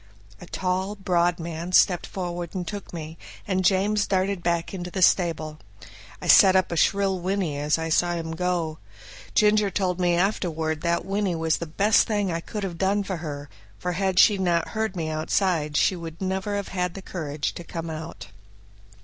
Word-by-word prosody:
A 175 - -11
tall, 190 +3 -2
broad 175 -3 +1
man 170 +2 -5
stepped 180 -2 +4
forward 175 -1 -5
and 180 -2 -3
took 205 -2 -6
me, 160 -1 -7 0.3
and 190 -2 0
James 200 +3 +2
darted 190 -1 0
back 170 +1 -1
into 180 -2 -5
the 185 +1 0
stable. 160 -4 +2 0.6
I - - -8
set 190 -3 +7
up 185 -2 +2
a - - -1
shrill 195 +2 +2
whinny 185 -4 -1
as 150 +2 +1
I 165 0 -3
saw 175 +2 +2
him 165 -1 -4
go. 165 -2 -2 0.6
Ginger 210 -1 +4
told 185 -2 -1
me 175 -1 +2
afterward 165 -4 -1
that 170 0 0
whinny 195 -2 -1
was 160 -1 +1
the 170 - -5
best 200 +7 +3
thing 205 -4 0
I 165 - -1
could 205 +5 -6
have 175 -4 -5
done 200 +2 +1
for 190 -2 -4
her, 145 -3 -6 0.3
for 180 - -3
had 190 +1 -1
she 205 +1 +6
not 175 -3 +1
heard 220 -3 -2
me 165 -3 -2
outside 155 -1 0
she 190 - +3
would 165 -2 -8
never 190 +2 -2
have 200 -1 -3
had 180 +1 -3
courage 150 -4 -3
to 175 - -8
come 165 -1 -6
out. 160 +1 -8
180 Hz, 185 wpm, -25 LUFS, 165-195 Hz, 0.6 s, set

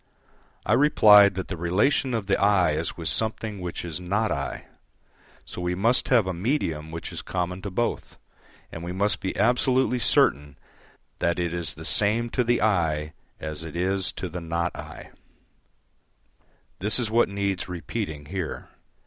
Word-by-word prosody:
I 105 - +2
replied 105 -7 +6
that 95 - -4
the 90 - -4
relation 105 - +1
of 110 -3 -2
the 100 - +2
"I" 100 -4 +4
is 80 +2 -3
with 85 -2 -4
something 110 -2 -1
which 90 0 -5
is 85 -1 -5
"not 100 +5 -1
I." - - -4 0.8
So - - -8
we 90 0 -1
must 115 +7 +2
have 120 -6 +4
a 95 - -2
medium 85 - -2
which 80 +1 -7
is - - -5
common 90 0 -3
to 100 - -5
both, 120 +6 -3 0.5
and 80 - -7
we 90 +1 -4
must 100 +3 0
be 95 - -3
absolutely 125 +3 +2
certain 75 - +2 0.6
that 85 0 0
it 85 -1 -2
is 85 -3 -2
the - - -8
same 115 +3 +2
to 125 - +1
the 120 -1 +1
"I" 80 -7 0 0.3
as 80 0 -5
it 80 0 -8
is 95 +2 0
to 95 - -5
the 90 +1 -6
"not 85 0 -2
I." - - -10 1.7
This 105 +3 +3
is 115 -4 -1
what 115 -1 +3
needs 100 -2 -2
repeating 85 -4 -5
here. 90 0 -5
95 Hz, 165 wpm, -25 LUFS, 85-110 Hz, 1.7 s, replied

